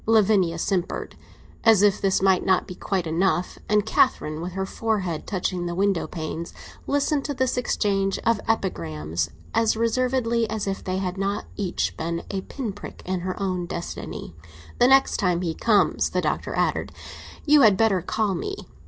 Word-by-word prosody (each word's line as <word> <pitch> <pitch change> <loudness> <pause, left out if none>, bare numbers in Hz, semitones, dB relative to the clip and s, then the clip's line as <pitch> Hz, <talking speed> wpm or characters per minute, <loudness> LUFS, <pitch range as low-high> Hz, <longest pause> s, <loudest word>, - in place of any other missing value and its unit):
Lavinia 200 -6 +3
simpered, 180 +1 -2 0.5
as 220 -3 +6
if 205 0 +3
this 190 -1 +2
might 190 -1 +4
not 185 -1 +2
be 185 - -6
quite 185 -1 -2
enough, 175 +2 0
and 210 -1 +3
Catherine, 155 -7 +1
with 175 +1 -5
her 190 0 -2
forehead 190 -6 -2
touching 180 -2 -2
the 175 - -3
window 195 -1 +1
panes, 160 0 -5 0.3
listened 285 0 +1
to 285 - -3
this 260 0 0
exchange 200 -5 0
of 230 0 +2
epigrams 80 - -1 0.2
as 225 -1 +2
reservedly 235 0 +1
as 220 -1 -2
if 195 -1 -3
they 185 0 -2
had 190 0 -3
not 200 +2 -1
each 190 -4 -2
been 170 +1 -3
a 195 -1 -2
pin 235 -1 -5
prick 205 - -10
in 185 0 -1
her 185 +3 -4
own 185 -3 -2
destiny. 170 - -6 0.4
"The 245 - +6
next 270 +1 +5
time 180 -4 +1
he 165 -2 -1
comes," 210 +3 +2
the - - 0
Doctor - - -2
added, - - 0 0.5
"you 300 -1 +6
had 210 -6 +6
better 210 -4 +3
call 210 +3 0
me. 395 - -3
195 Hz, 170 wpm, -24 LUFS, 180-225 Hz, 0.5 s, as